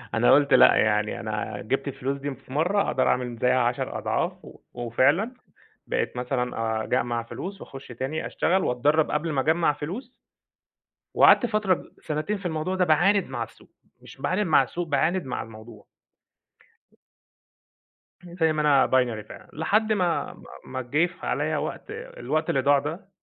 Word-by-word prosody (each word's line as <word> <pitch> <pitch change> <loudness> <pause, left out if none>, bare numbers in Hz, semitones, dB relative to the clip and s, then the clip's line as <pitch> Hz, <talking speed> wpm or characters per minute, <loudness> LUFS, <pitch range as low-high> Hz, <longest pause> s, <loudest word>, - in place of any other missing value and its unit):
أنا 115 +2 +4
قلت 145 0 +5
لأ، - - +7
يعني 105 0 +1
أنا 105 -1 -4
جِبت 135 +6 -2
الفلوس 135 0 -3
دي 140 0 -5
في 130 0 -14
مرة 180 +8 +2
أقدر - - +1
أعمل 125 -2 0
زيها 125 +2 +2
عشر 120 0 -1
أضعاف، - - -1
و - - -14
وفعلًا 130 - +1 0.5
بقيت - - -2
مثلًا 125 -3 -2
أجمع 120 -1 -1
فلوس، 195 +11 -7
وأخش 135 0 -10
تاني 130 +6 -4
أشتغل 190 +2 +1
وأتدرب 150 +6 +2
قبل 155 +2 -1
ما 135 -3 +1
أجمع 160 +1 +2
فلوس، 210 - -7 1.0
وقعدت 245 - +6
فترة 215 -4 +2
ب - - -12
سنتين 155 +7 -2
في 195 - -7
الموضوع 160 +2 -2
ده، 185 - +3
باعاند 180 +5 +3
مع 125 -3 -4
السوق، 115 - -19 0.3
مش - - -14
باعاند 185 +3 0
مع 155 -4 +5
السوق 170 +7 -4
باعاند 160 +6 +1
مع 130 - -4
الموضوع. 110 -1 -13 2.4
زي 170 -2 0
ما 155 - -2
أنا 145 -2 +4
Binary 120 -5 0
فعلًا، - - -12
لحد 215 +8 +1
ما 180 -5 0
ما - - -16 0.2
ما 130 0 -5
جه 145 +8 +1
في 180 - -10
عليّا - - 0
وقت، - - -5
الوقت 455 - -4
اللي 135 - +2
ضاع 140 +2 +4
ده 160 +8 -5
145 Hz, 165 wpm, -25 LUFS, 125-175 Hz, 2.4 s, لأ